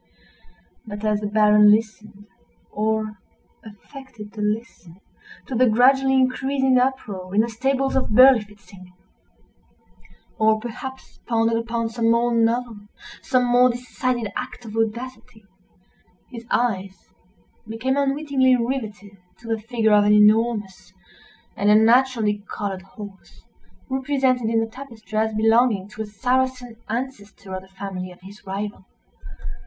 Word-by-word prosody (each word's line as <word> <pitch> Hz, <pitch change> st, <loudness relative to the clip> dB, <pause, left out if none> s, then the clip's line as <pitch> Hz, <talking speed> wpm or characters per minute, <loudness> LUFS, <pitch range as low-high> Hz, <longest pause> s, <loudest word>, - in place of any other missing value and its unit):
But 205 Hz, 0 st, -7 dB
as 210 Hz, -1 st, +1 dB
the 210 Hz, -, -2 dB
Baron 210 Hz, 0 st, +5 dB
listened, 215 Hz, -1 st, -1 dB, 0.5 s
or 215 Hz, -1 st, -2 dB, 0.4 s
affected 220 Hz, 0 st, -12 dB
to 215 Hz, -, -6 dB
listen, 210 Hz, -5 st, -4 dB, 0.5 s
to -, -, -7 dB
the 250 Hz, 0 st, +3 dB
gradually 265 Hz, +4 st, +4 dB
increasing 265 Hz, 0 st, +2 dB
uproar 205 Hz, -8 st, -3 dB
in 215 Hz, -, +5 dB
the 235 Hz, -, -2 dB
stables 270 Hz, +4 st, -1 dB
of 265 Hz, -, 0 dB
Berlifitzing—or 210 Hz, -1 st, -1 dB
perhaps 260 Hz, +3 st, -9 dB
pondered 230 Hz, -1 st, +1 dB
upon 230 Hz, 0 st, -3 dB
some 230 Hz, 0 st, 0 dB
more 235 Hz, +1 st, +2 dB
novel, 230 Hz, -1 st, 0 dB, 0.4 s
some 255 Hz, -1 st, +1 dB
more 245 Hz, +1 st, +4 dB
decided 245 Hz, -2 st, -3 dB
act 250 Hz, -1 st, -6 dB
of 220 Hz, -1 st, -8 dB
audacity—his 225 Hz, -2 st, -8 dB
eyes 195 Hz, -5 st, -2 dB, 0.6 s
became 225 Hz, +4 st, -2 dB
unwittingly 275 Hz, -2 st, +2 dB
rivetted 215 Hz, -6 st, -4 dB, 0.2 s
to 235 Hz, -, -15 dB
the 225 Hz, -1 st, -2 dB
figure 225 Hz, -1 st, +1 dB
of 205 Hz, 0 st, +5 dB
an 210 Hz, 0 st, +4 dB
enormous, 210 Hz, -2 st, +2 dB, 0.6 s
and 205 Hz, -, +1 dB
unnaturally 220 Hz, -1 st, +3 dB
colored 195 Hz, -3 st, -4 dB
horse, 195 Hz, 0 st, -13 dB, 0.4 s
represented 260 Hz, -3 st, 0 dB
in 225 Hz, 0 st, +1 dB
the 225 Hz, -, -2 dB
tapestry 230 Hz, -5 st, -11 dB
as 220 Hz, 0 st, +1 dB
belonging 225 Hz, -2 st, +2 dB
to 210 Hz, +1 st, -8 dB
a 220 Hz, -, -4 dB
Saracen 250 Hz, +2 st, -1 dB
ancestor 215 Hz, -5 st, -6 dB
of 185 Hz, -, -4 dB
the 190 Hz, -, -17 dB
family 190 Hz, -1 st, -7 dB
of 180 Hz, -, -16 dB
his 200 Hz, +3 st, -14 dB
rival. 200 Hz, 0 st, -5 dB
225 Hz, 125 wpm, -22 LUFS, 210-250 Hz, 0.6 s, Baron